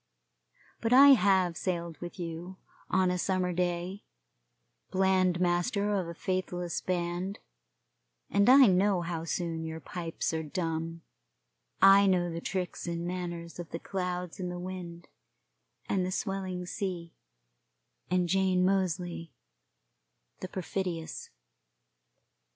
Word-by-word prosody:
But 230 +1 +1
I 275 +2 +9
have 190 -8 +5
sailed 170 -2 -3
with 175 +2 -7
you, 175 +1 -6 0.3
on 185 0 +3
a 180 - -1
summer 185 -1 0
day, 180 +2 -2 0.9
bland 185 -2 +2
master 180 +4 +1
of 190 -4 0
a 170 - -7
faithless 180 -2 -2
band; 180 +2 -2 0.9
and 200 +3 +3
I 265 +1 +9
know 190 -1 +3
how 165 -1 -4
soon 165 -1 -2
your 160 0 -5
pipes 165 -1 -4
are 160 - -1
dumb 165 +1 -3 0.8
I 195 +1 +8
know 175 -2 +2
the 165 0 -5
tricks 185 -1 -3
and 170 0 -3
manners 175 -1 -5
of 175 - -6
the - - -4
clouds 180 -1 -4
and 180 -1 -3
the 175 - -5
wind, 175 -2 -7 0.8
and 190 -2 +1
the 180 - -1
swelling 190 -2 -3
sea, 175 -3 -4 1.0
and 180 0 +2
Jane 185 0 +2
Moseley, 180 -3 -1 1.0
the 185 - -5
perfidious. 180 -3 -4
180 Hz, 120 wpm, -30 LUFS, 170-190 Hz, 1.0 s, I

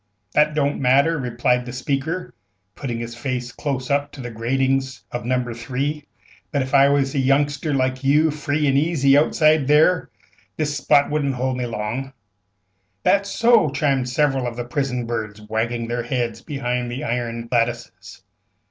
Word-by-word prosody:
"That 150 0 +3
don't 145 -1 0
matter," 140 +5 +3
replied 125 0 0
the - - -5
speaker, 140 +8 -3 0.4
putting 120 +1 -4
his 115 0 -5
face 125 0 -4
close 130 -1 -3
up 145 +1 0
to 135 - -8
the 120 -1 -6
gratings 130 +1 -1
of 120 -2 -5
No. 125 -1 -1
3, 135 +6 -3 0.5
"but 140 -2 +1
ef 130 - -8
I 140 0 +6
was 140 -1 +1
a 140 - 0
youngster 145 +3 +1
like 130 -1 0
you, 150 +3 +4
free 150 0 -1
an' 135 -1 +3
easy 140 -3 +3
outside 155 -1 +3
there, 155 +4 +4 0.5
this 150 -2 -1
spot 145 0 +3
wouldn't 140 -3 0
hold 130 +1 -1
me 125 -1 -2
long." 120 +5 -4 0.9
"That's 200 0 +2
so!" 230 -6 +4
chimed 135 -2 0
several 135 -1 +1
of 120 - -5
the 120 0 -4
prison 125 -2 -2
birds, 110 -3 -4
wagging 115 +2 -2
their 120 +1 -2
heads 120 -2 -2
behind 125 -4 -3
the 120 +2 -5
iron 115 -1 -3
lattices. 115 -7 -2
130 Hz, 165 wpm, -22 LUFS, 120-145 Hz, 0.9 s, I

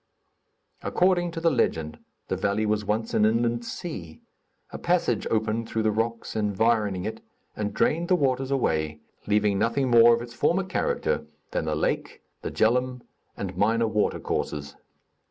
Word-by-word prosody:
According 180 -1 +2
to 165 - -3
the 165 0 +3
legend, 80 - 0 0.3
the - - -1
valley 100 +2 0
was 105 0 0
once 110 +2 -1
an 105 - +3
inland 115 +2 +2
sea; 95 - -7 0.5
a - - -7
passage - - +1
opened 110 +1 0
through 110 - -1
the 110 - +3
rocks 115 +2 -2
environing 105 -2 +1
it, 110 +1 -5 0.3
and 105 -1 -2
drained 170 +3 +1
the 185 - +4
waters 135 -4 0
away, 80 - 0 0.3
leaving 105 -1 +2
nothing 120 +4 +1
more 120 0 +8
of 120 - -5
its 120 0 -10
former 180 +9 +1
character 475 - -1 0.2
than - - -1
the - - -1
lake, - - -2 0.2
the - - -3
Djeloum 125 +2 +1 0.3
and 95 -2 -4
minor 115 +4 +2
water 105 -1 0
courses. 70 -1 -3
115 Hz, 155 wpm, -26 LUFS, 105-130 Hz, 0.5 s, more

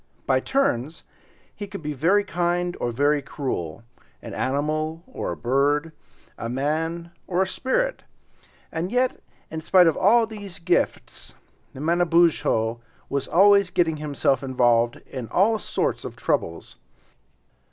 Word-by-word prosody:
By 130 -1 +3
turns 160 - -1 0.5
he 205 -1 -7
would 195 -5 -7
be 150 0 -3
very 180 +9 +3
kind 175 -1 -1
or 120 - -1
very 145 +5 +2
cruel, 115 - -4 0.4
an - - -7
animal 155 +4 -1
or - - -5
a 85 - -5
bird, 145 +5 +1 0.5
a 115 - -4
man 160 +6 -2 0.2
or 185 +1 +2
a - - -4
spirit, - - -1 0.7
and 170 +4 -3
yet, 250 +1 +1 0.3
in 160 0 -4
spite 180 +2 +5
of 165 - +3
all 225 +4 +4
these 205 -5 -9
gifts, 170 +2 -2 0.4
Manabozho 165 -7 +2 0.3
was 140 -1 -2
always 200 +1 +5
getting 170 -4 +1
himself 145 -3 0
involved 120 -3 +2
in 130 -4 -7
all 210 - +2
sorts - - -2
of - - -7
troubles. 85 - -2
160 Hz, 130 wpm, -24 LUFS, 135-185 Hz, 0.7 s, spite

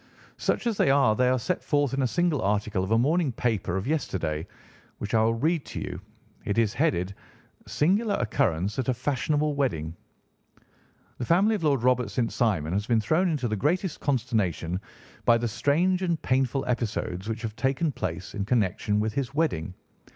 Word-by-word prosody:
"Such - - -1
as 230 -4 0
they - - +3
are, 135 -5 +4
they 125 +2 +3
are 130 - +3
set 170 +9 -2
forth 145 -3 +1
in 135 - 0
a 130 - +2
single 175 0 +1
article 105 -1 0
of 95 - -3
a 115 - +4
morning 150 +4 +2
paper 110 -6 -1
of 95 - -3
yesterday, 90 - -2 0.5
which 105 +4 -5
I 110 - +4
will 115 +1 +2
read 155 +5 +1
to 115 - -5
you. 90 - -5 0.4
It 100 - -2
is 110 -2 +2
headed, 90 -4 0 0.5
'Singular 200 +7 +2
Occurrence 100 -2 0
at 130 - -1
a 125 - +2
Fashionable 145 +4 0
Wedding': 85 - -1 1.2
"'The 120 - -2
family 195 - +4
of 205 -6 -2
Lord 140 -6 +2
Robert 125 -3 +2
St. 115 +3 -1
Simon 85 -9 0
has 100 +3 -1
been 115 -2 +3
thrown 160 - +2
into 145 -6 -1
the 110 - -1
greatest 165 - 0
consternation 110 - -1 0.4
by 115 - +5
the 120 +1 -1
strange 175 - +1
and 170 -4 0
painful 130 +1 +1
episodes 110 -5 -2
which 115 +1 -4
have 110 -2 -4
taken 135 +5 0
place 90 -5 -5
in 100 - -2
connection 105 -2 +1
with 110 0 -1
his 140 +1 -3
wedding. 95 - -1
120 Hz, 185 wpm, -26 LUFS, 105-145 Hz, 1.2 s, by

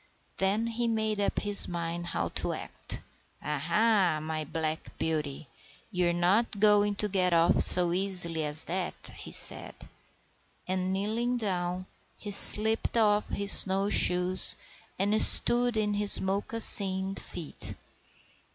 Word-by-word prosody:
Then 200 +4 -1
he 230 +1 -4
made 220 -2 -3
up 200 - -3
his 205 -1 +7
mind 170 0 -6
how 85 - -4
to - - -3
act. - - -8 0.4
"Ha, 150 0 -5
ha, 180 +1 0
my 155 0 -6
black 160 +1 -6
beauty! 155 -3 -5 0.4
You're 180 -3 -1
not 195 +5 -1
going 205 -1 +2
to 210 - -2
get 185 -3 -1
off 165 0 +1
so 175 -1 +7
easily 180 -4 -2
as 150 +1 0
that," 180 +1 -5 0.2
he - - -11
said. - - -1 0.9
And, 185 0 -3
kneeling 225 +6 -3
down, 185 -4 -5 0.3
he 205 - -8
slipped 220 +3 0
off 210 -2 0
his 200 0 -2
snow 195 +1 +2
shoes 180 0 0 0.4
and 205 +3 0
stood 240 -1 +3
in 210 -1 -1
his 205 0 +3
moccasined 195 -1 +4
feet. 160 -4 -6
190 Hz, 135 wpm, -26 LUFS, 175-210 Hz, 0.9 s, his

